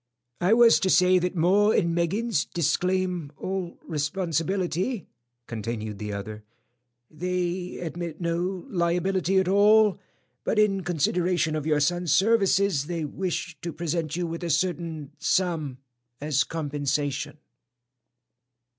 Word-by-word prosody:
"I 180 +5 +3
was 235 -1 +6
to 190 - 0
say 185 0 +5
that 180 +1 -2
'Maw 190 +5 +4
and 170 -1 +2
Meggins' 180 +2 0
disclaim 180 0 0
all 185 -2 -4
responsibility," 175 - -1 0.4
continued 110 -2 -5
the 105 0 -4
other. 105 +1 -6 0.7
"They 180 +2 -3
admit 170 -1 -5
no 175 +2 -2
liability 180 +1 0
at 190 -1 +3
all, 210 +1 +5 0.4
but - - -1
in 205 -2 +3
consideration 175 0 0
of 155 0 -3
your 150 -2 +2
son's 175 +2 0
services, 195 -7 +3
they 170 -3 -2
wish 180 +4 -4
to 170 - -4
present 160 -1 -2
you 175 0 -1
with 165 +1 -5
a 170 - -2
certain 165 -2 -1
sum 160 -5 0 0.4
as 150 -2 +1
compensation." 145 -2 -2
175 Hz, 120 wpm, -26 LUFS, 155-185 Hz, 0.7 s, was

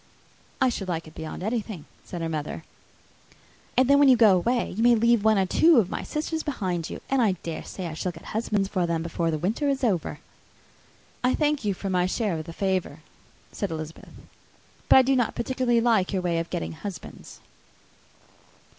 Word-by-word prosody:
"I 260 - +4
should 200 -5 -4
like 165 -2 -3
it 155 - -13
beyond 160 +3 -7
anything!" 215 -6 -3 0.2
said 175 - -7
her - - -1
mother. 155 0 -4 1.1
"And 255 0 +5
then 280 +1 +5
when 285 -1 +6
you 255 - +6
go 215 -4 +6
away, 235 +7 0
you 210 - -3
may 240 0 +6
leave 235 -1 +3
one 220 -1 +4
or 190 - +3
two 320 - +5
of 205 -6 +3
my - - -3
sisters 315 +1 -3
behind 185 - -3
you; - - -7
and 270 -1 +2
I 215 -5 +3
dare 165 -1 -5
say 185 - -7
I 165 - -4
shall 180 +3 -3
get 165 -1 -14
husbands 210 -3 0
for 185 -3 -1
them 165 -1 -1
before 170 0 -1
the 155 - 0
winter 220 - -1
is 275 -1 -1
over." 190 -9 0 1.0
"I 250 - +3
thank 300 -3 +1
you 205 -2 0
for 195 +1 -4
my 180 -1 +2
share 190 -4 -1
of 155 - -7
the 170 - -8
favour," 185 -4 -2 0.5
said 200 - -3
Elizabeth; 160 0 -7 0.8
"but - - +8
I 265 - +9
do 270 +1 +2
not 245 -3 0
particularly 240 -1 +1
like 225 -6 +2
your 185 -2 -1
way 170 -2 0
of 165 - -4
getting 175 - -3
husbands." 180 +4 -9
200 Hz, 200 wpm, -26 LUFS, 170-240 Hz, 1.1 s, I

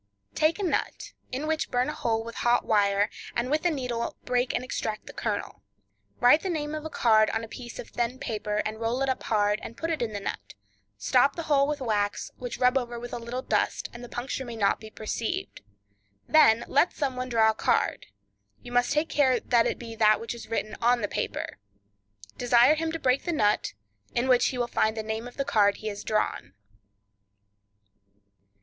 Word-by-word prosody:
—Take 310 +2 +2
a 410 - -3
nut, 360 - -2 0.2
in 270 +4 -3
which 315 0 -1
burn 250 0 +1
a 300 - -2
hole 225 -1 -1
with 230 0 -8
a - - -4
hot 240 0 +2
wire, 205 -1 +3 0.3
and 245 +3 -1
with 305 +1 +1
a - - +5
needle 250 -6 -3
break 250 0 +1
and - - -2
extract 220 -4 -4
the - - -10
kernel. - - -3 0.6
Write 245 +6 +6
the 380 - -3
name 300 -3 -2
of 310 -1 -4
a 315 - -5
card 220 -6 +4
on 225 - -2
a - - -6
piece 240 +1 -9
of - - -8
thin 240 +1 -2
paper, 210 -4 -2
and 215 +1 -4
roll 235 +4 0
it 270 - 0
up 260 - -1
hard, 210 -1 +1
and 230 - -9
put 330 +1 -2
it 315 - -2
in 235 -2 -1
the 205 - -4
nut; 100 - -6 0.4
stop 255 - +3
the 335 - -4
hole 280 -2 +3
with 295 -1 -2
wax, 205 -4 -1
which 245 -1 -5
rub 250 +1 +4
over 240 -1 -6
with 240 0 -8
a - - -3
little 240 +2 -5
dust, - - 0
that 240 - -9
the 245 - -9
puncture 260 +2 -4
may 240 -2 -7
not 200 -3 +2
be 220 - -10
perceived, 230 - -4 0.7
then 235 -7 +5
let 285 +6 +3
some 275 -4 -2
one 255 0 -4
draw 220 -2 +4
a - - -6
card; - - 0 0.6
you 245 - -9
must 245 0 +2
take 300 +2 +1
care 275 -5 +3
it 240 -1 +2
be 230 -1 -8
that 215 -1 +4
which 230 - -5
is 235 - -10
written 220 -1 -2
on 240 +1 +3
the 205 - 0
paper; - - -4 0.8
desire 245 +3 +5
him 320 +1 -1
to 330 - -3
break 260 -3 +1
the 350 - -1
nut, 210 -10 +1 0.4
in 240 +2 +1
which 250 -2 +4
he 255 - -3
will 240 - +1
find 220 -1 0
the 220 - -2
name 220 +2 -4
of 245 - -13
the 275 - -1
card 205 -4 +3
he 215 - -4
has 205 -1 -6
drawn. 215 - -1
240 Hz, 215 wpm, -27 LUFS, 220-270 Hz, 0.8 s, Write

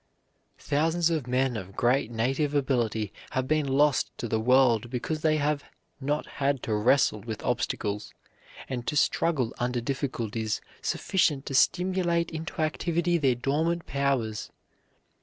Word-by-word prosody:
Thousands 165 +3 +1
of 155 -6 -1
men 125 0 +1
of 95 -2 -7
great 125 0 +2
native 135 +6 0
ability 120 -7 0 0.2
have 130 0 0
been 155 -1 +1
lost 140 +1 +3
to 120 - -3
the 110 0 0
world 120 -1 +4
because 135 +5 -3
they 155 -1 +3
have 150 0 0 0.4
not 145 +2 -1
had 140 -2 -1
to 110 - -1
wrestle 110 +1 +3
with 110 0 -6
obstacles, 105 0 -2 0.6
and 125 -2 -5
to - - -1
struggle 145 -4 +1
under 125 0 0
difficulties 115 -4 -2 0.2
sufficient 150 -7 +1
to - - -5
stimulate 175 +2 +2
into 160 0 -5
activity 170 +2 0
their 135 -4 +3
dormant 155 +7 0
powers. 130 -6 -1
135 Hz, 140 wpm, -27 LUFS, 120-155 Hz, 0.6 s, world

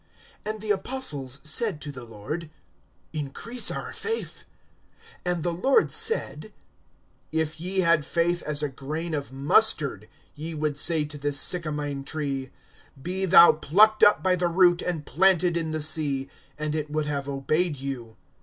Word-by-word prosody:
(5)And 215 0 -4
the 215 -1 -1
apostles 185 - -1
said 160 +3 -2
to 145 - -6
the 125 -3 -10
Lord: 120 +10 -6 0.6
Increase 155 - -1
our - - -5
faith. 450 +1 -5 0.8
(6)And 175 -3 -1
the 175 - -1
Lord 270 - +2
said: 460 - 0 0.8
If 160 0 -2
ye 190 +2 0
had 170 -3 +3
faith 170 +2 0
as 150 0 -3
a - - +1
grain 155 +5 -5
of 145 -3 -3
mustard, 135 - +1 0.2
ye 160 +2 -6
would 150 -1 -1
say 155 +1 +1
to 145 0 -9
this 145 0 -1
sycamine 150 -5 -1
tree, 140 -3 -4 0.5
Be 185 +6 -2
thou 175 -1 +9
plucked 210 +9 +4
up 205 - +6
by 185 -1 +3
the 175 0 0
root, 175 0 +4
and 165 -5 -3
planted 180 0 +3
in 165 -1 0
the 155 0 -2
sea; 145 -3 0 0.3
and 150 0 -3
it 155 -1 -3
would 155 0 -1
have 140 -1 -3
obeyed 150 +4 0
you. 125 -5 -6
155 Hz, 155 wpm, -26 LUFS, 145-180 Hz, 0.8 s, thou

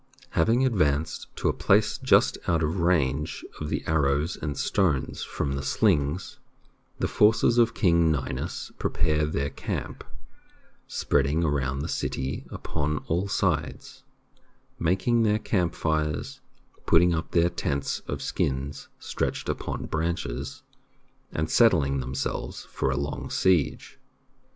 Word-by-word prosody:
Having 115 +10 +3
advanced 80 - 0
to - - -1
a - - +3
place - - +2
just - - +4
out 85 -1 +2
of 80 +5 -1
range 75 -4 +1
of 75 - -4
the - - -2
arrows 75 +1 +1
and 75 -2 -4
stones 85 -10 0
from 70 -2 -3
the 70 - -2
slings, 80 0 0 0.6
the - - 0
forces 115 +2 +4
of 115 -1 +3
King 85 -5 +3
Ninus 70 -4 -3
prepare 75 0 +1
their 70 -2 -2
camp, - - -5 0.8
spreading 75 +4 +1
around 70 -3 0
the - - -3
city 65 +1 -3
upon 75 -1 -2
all 90 +5 +1
sides, - - -2 0.8
making 95 +8 +2
their 105 -1 +3
camp 90 -6 0
fires, 75 -2 -1 0.5
putting 85 +1 +5
up 80 -1 -2
their 85 +1 +3
tents 70 -5 -2
of - - -4
skins 70 +2 -2
stretched - - -3
upon - - -3
branches, 80 -6 -3 0.7
and 80 +1 -1
settling 80 - +4
themselves 65 0 -4
for - - -1
a 65 - 0
long 70 0 -3
siege. 90 -6 +1
80 Hz, 125 wpm, -26 LUFS, 70-90 Hz, 0.8 s, putting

